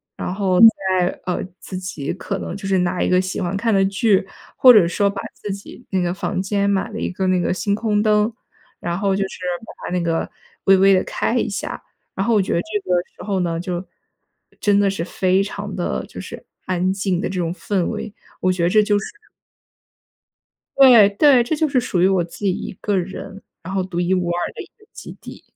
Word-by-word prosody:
然 - - -4
后 190 -2 +1
再， 190 -5 +5 0.2
呃， 180 - -2 0.2
自 190 - -9
己 180 -6 -4
可 195 +2 -4
能 - - -5
就 200 -1 -6
是 195 -1 +2
拿 180 0 0
一 - - +1
个 180 0 +4
喜 185 +1 -3
欢 185 +2 -2
看 225 +1 0
的 195 0 +4
剧， 200 0 +2 0.3
或 255 - +8
者 205 -7 +6
说 200 +3 +1
把 200 - -5
自 210 - -6
己 200 +5 -9
那 190 - 0
个 175 0 0
房 185 - -3
间 200 +1 0
买 200 +2 0
了 215 - -5
一 - - -2
个 190 +1 -2
那 185 -1 +2
个 175 - 0
星 200 +2 -1
空 210 -1 0
灯， 210 +1 +3 0.5
然 170 0 -3
后 195 -2 +1
就 195 - 0
是 - - -11 0.3
把 - - -10
它 - - -8
那 180 - 0
个 165 -1 -1 0.4
微 195 -1 +6
微 195 +1 +5
地 185 - +3
开 - - -2
一 - - +1
下。 - - -5 0.3
然 195 - -1
后 230 - +3
我 - - +4
觉 190 - -2
得 170 - +2
这 215 +1 -3
个 180 - +3 0.2
时 - - -9
候 200 -2 -1
呢， 170 -2 -1
就 180 0 -4 0.8
真 205 -1 +3
的 205 - +3
是 195 -4 -3
非 185 +2 +1
常 200 0 -6
地 120 - -2
就 - - -9
是 - - -10 0.2
安 185 +1 0
静 190 -2 -1
的 210 - -2
这 185 -1 -3
种 165 -2 -1
氛 185 +1 -1
围， 210 - -5 0.3
我 185 - +2
觉 180 -1 -2
得 170 - +3
这 215 +2 +4
就 205 0 +2
是 - - -6 1.7
对 245 -7 +8
对， 255 +4 +5
这 300 +6 -2
就 310 0 +1
是 270 -3 +2
属 185 -6 -1
于 185 - +5
我 190 -2 +2
自 170 - -10
己 190 - +3
一 - - -5
个 205 -2 0
人， 190 +2 -5 0.2
然 185 +3 -6
后 190 - +1
独 180 -2 -4
一 180 +1 +1
无 180 -2 -1
二 175 0 -2
的 - - -6
一 - - -14
个 425 - -22
基 - - -10
地。 - - -11
195 Hz, 250 characters per minute, -20 LUFS, 180-205 Hz, 1.7 s, 或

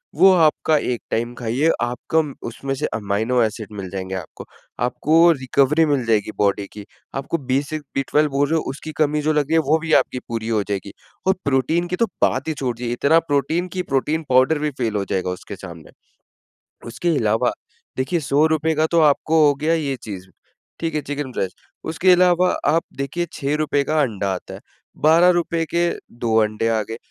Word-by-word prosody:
वो 190 - +7
आपका 160 -2 +3
एक 125 -4 -2
टाइम 120 +2 -1
खाइए, 125 +7 0
आपका 125 +7 0
म 150 -3 -6
उसमें 135 +4 -4
से - - -2
अमाइनो 110 +4 0
एसिड 110 -1 -2
मिल 95 -2 -6
जाएँगे 95 0 -5
आपको। 90 -4 -8 0.4
आपको 165 +6 +4
रिकवरी 140 +2 +2
मिल 145 -4 +1
जाएगी 110 -2 +1
बॉडी 100 0 +1
की। 105 -1 -9 0.3
आपको 140 +5 -2
B6-B12 145 +1 0
वो 140 +1 +2
जो 160 +2 +1
उसकी 155 +3 -8
कमी 150 -1 +1
जो 155 +1 +1
लग 150 -1 +2
रही - - 0
है 165 - +5
वो 160 - +5
भी 160 0 -2
आपकी 125 - -6
पूरी 115 -1 -3
हो 110 -2 +1
जाएगी। 100 0 -3 0.4
और 190 - +5
प्रोटीन 140 +6 +1
की 180 - -2
तो 230 - +2 0.2
बात 130 +3 +1
ही - - 0
छोड़ 130 -5 -3
दीजिए 120 0 -3
इतना 140 +6 +4
प्रोटीन 145 +5 0
की - - +1
प्रोटीन 150 +3 -1
पाउडर 130 +4 +4
भी 150 0 -1
फ़ेल 115 -4 -1
हो 100 -1 -1
जाएगा 95 -1 -1
उसके 90 +2 -7
सामने। 85 -5 -11 1.0
उसके 170 +9 -1
इलावा 110 -4 +1 0.5
देखिए 135 +7 0
₹100 155 +3 +2
का 155 +1 +2
तो 170 - +4
आपको 155 +1 +3
हो 145 - +4
गया 160 +2 +2
ये 145 -4 -1
चीज़ 95 -4 -7 0.5
ठीक 165 -2 -3
है 150 - 0
चिकन 145 -1 -5
ब्रेस्ट 95 -6 -3 0.3
उसके 175 +3 +3
अलावा 180 0 +4 0.2
आप 160 +3 +3
देखिए 140 +6 -2
₹6 145 0 0
का 155 +2 0
अंडा 105 -7 -1
आता 90 - -7
है। - - -8 0.4
₹12 170 +1 +4
के 170 0 +2 0.2
2 115 -1 -2
अंडे 110 +1 0
आ 110 -1 +1
गए, 115 - -5
140 Hz, 190 wpm, -21 LUFS, 115-160 Hz, 1.0 s, वो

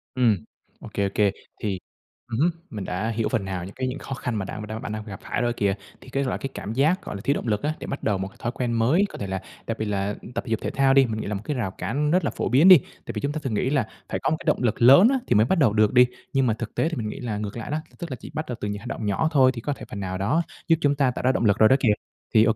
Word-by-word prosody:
Ừm, 120 -5 +4 0.4
OK, - - -10
OK. 100 0 +2 0.3
Thì 100 -3 -2 0.5
ừm 115 - -1
hứm, 170 +4 +4 0.2
mình 105 -3 -5
đã 100 +5 -2
hiểu 115 -1 -1
phần 110 -6 -1
nào 95 -2 -4
những 95 - -9
cái 130 0 -2
những 130 +3 -4
khó - - -6
khăn 125 -2 -3
mà 95 - -2
đang 110 - -6 0.2
bạn - - -5
đang 110 0 -4
phải 105 - -10
gặp 95 - -7
phải - - -2
rồi 120 -1 +1
kìa. 100 -4 +1 0.3
Thì - - -13
cái, 140 +2 0
gọi, 130 - -1
cái 135 - -4
cảm 105 - -5
giác, 155 +9 +2
gọi - - -5
là, 100 - -6
thiếu 140 - +2
động 135 - -4
lực 105 -2 0
á, 150 +1 +1
để - - -7
bắt 140 - -5
đầu 105 -3 +1
một 95 - -3
cái 110 +5 -16
thói 120 - -2
quen 125 -1 -2
mới, 125 - +3
có - - -9
thể 100 - -4
là 95 0 -3 0.3
đặc 115 - -2
biệt 110 - -2
là 100 0 -1 0.2
tập - - -1
thể - - -5
dục, 110 - +1
thể - - -2
thao 135 0 +3
đi, 135 0 +6
mình 110 -2 -3
nghĩ - - -5
là 105 - -2
một 100 - -3
cái 150 - -2
rào 105 -6 -1
cản 145 +10 -1
rất 180 +2 +3
là - - 0
phổ - - -2
biến 140 +9 +5
đi. 185 - +12
Tại 135 - -9
vì - - -3
chúng 140 - -1
ta 155 - -3
thường 130 - -2
nghĩ 115 +5 +1
là 135 -6 +1 0.2
phải - - -2
có - - +2
một 155 - +2
cái - - -10
động 150 - +2
lực 120 -1 0
lớn 140 - +9
á, 270 - +2
thì 120 - +3
mới 110 +2 +5
bắt 190 - +1
đầu 115 -8 +4
được 105 -1 +3
đi. 125 0 +8 0.3
Nhưng 135 -2 +3
mà 115 - +3
thực 110 0 -6
tế 160 - +1
thì 165 - -4
mình 110 -2 -2
nghĩ - - -7
là 110 -4 -3
ngược 105 +1 -4
lại 115 - -5
đó, 150 - 0 0.2
t - - -28
tức 170 -5 -6
là - - -2
chỉ - - -10
bắt 155 +1 -3
đầu 125 - -3
từ - - -2
những 105 0 -3
hành - - -10
động 110 - -4
nhỏ 105 +10 +1
thôi 130 -3 +5
thì 115 - -6
có 145 +4 -1
thể - - -10
phần 100 - -6
nào 95 -1 -3
đó 105 - +1 0.3
giúp 165 - +6
chúng 145 0 +3
ta 135 -3 +2
tạo 125 - -5
ra 130 - +4
động 120 - 0
lực 100 - +4
rồi 110 - +6
đó 130 - +6
kìa. 115 -5 +4 0.4
Thì, 110 -2 +7
OK, 110 -1 +3
115 Hz, 350 wpm, -25 LUFS, 105-135 Hz, 0.5 s, đi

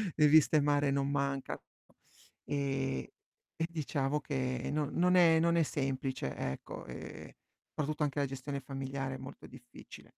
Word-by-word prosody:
le 150 -1 +6
viste 155 0 +6
mare 145 -1 +3
non 140 0 +1
mancano 140 -1 -1 0.8
e 135 - -1 0.5
e 165 - +1
diciamo 150 -3 -1
che 130 -3 -2
non 150 -2 0
non 180 +1 +4
è 165 -2 +6
non 170 +1 +3
è 165 - +5
semplice, 135 - -2
ecco, 65 - -5
ehm, 65 0 -8 0.4
soprattutto 150 0 -1
anche 145 0 0
la 140 - +2
gestione 135 +1 -4
familiare 135 0 -4
è - - -6
molto 130 +1 -10
difficile. 125 -1 -13
140 Hz, 145 wpm, -33 LUFS, 135-150 Hz, 0.8 s, le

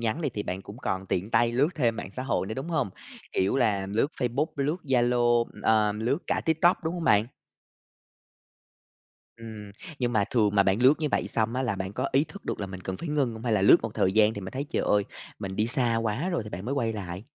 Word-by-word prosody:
nhắn 115 +8 -1
này, 145 -5 -1
thì 105 - -2
bạn 95 0 -4
cũng 105 +4 -11
còn 95 -4 -3
tiện 95 +5 -2
tay 120 0 +3
lướt 140 +6 +3
thêm 120 -6 +1
mạng 95 - -6
xã 130 - -5
hội 120 -7 -1
nữa, 110 - -4
đúng 135 +6 -5
hông? 130 - 0 0.4
Kiểu 95 +7 +1
là 100 -6 +1
lướt 105 +7 +1
Facebook, 125 +5 +1
lướt 145 +4 0
Zalo, 120 -2 +3
ừm, - - -15
ờ, 110 -2 +3
lướt 120 +8 -1
cả - - 0
TikTok, 160 +2 +3
đúng 165 +2 -1
hông 170 -2 -4
bạn? 105 -4 +4 2.1
Ừm, 110 -3 -9 0.3
nhưng 120 -2 0
mà 105 -2 +3
thường 110 -4 +3
mà 100 - +6
bạn 100 +5 +1
lướt 135 +4 +7
như 150 - 0
vậy - - 0
xong 115 +2 -1
á 130 - 0
là 110 -6 -1
bạn 95 +1 -4
có - - -2
ý 140 +3 +4
thức 180 +6 -12
được - - -3
là 100 - -2
mình 95 -1 -8
cần 95 0 -4
phải 170 - -6
ngưng 140 -5 +1
hông? 110 +2 -9
Hay 115 - 0
là 100 -3 +2
lướt - - +8
một - - -4
thời 95 - +2
gian 110 +1 +4
thì 100 - -5
mình 95 - -7
thấy 140 +2 -3
"Trời - - -1
ơi, 105 -1 +2 0.3
mình 95 -1 -5
đi 110 +1 +1
xa 120 -2 +1
quá 115 - -1
rồi" 170 -10 -1
thì 105 - -9
bạn 90 +4 -6
mới 135 +4 -2
quay 115 -5 0
lại? 95 -1 -6
115 Hz, 255 wpm, -27 LUFS, 100-130 Hz, 2.1 s, lướt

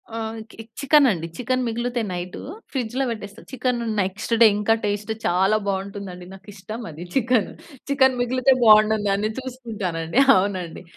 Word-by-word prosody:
ఆహ్, 225 0 -4
కి 225 - -11 0.2
చికెనండి. 265 - +3
Chicken 255 +1 -1
మిగులితే 240 +1 -2
night 180 0 -5 0.3
ఫ్రిడ్జ్‌లో 255 0 -2
పెట్టేస్తా 210 0 -8
చికెను 250 -2 -1 0.2
నెక్స్‌ట్ 195 +5 -3
డే 230 - +10
ఇంకా 210 +2 +2
టేస్ట్ 205 +1 -2
చాలా 190 +4 +3
బావుంటుందండి. 195 -2 -4
నాకు 195 +1 -15
ఇష్టం 215 +4 -8
అది 160 +3 -9
చికెను. 245 -4 +1 0.4
చికెన్ 265 -2 +3
మిగిలితే 255 +2 +3
బావుంటుందని 215 -1 +4
చూసుకుంటానండి. 220 -8 -3 0.2
అవునండి. 185 -3 -2
215 Hz, 130 wpm, -23 LUFS, 195-245 Hz, 0.4 s, డే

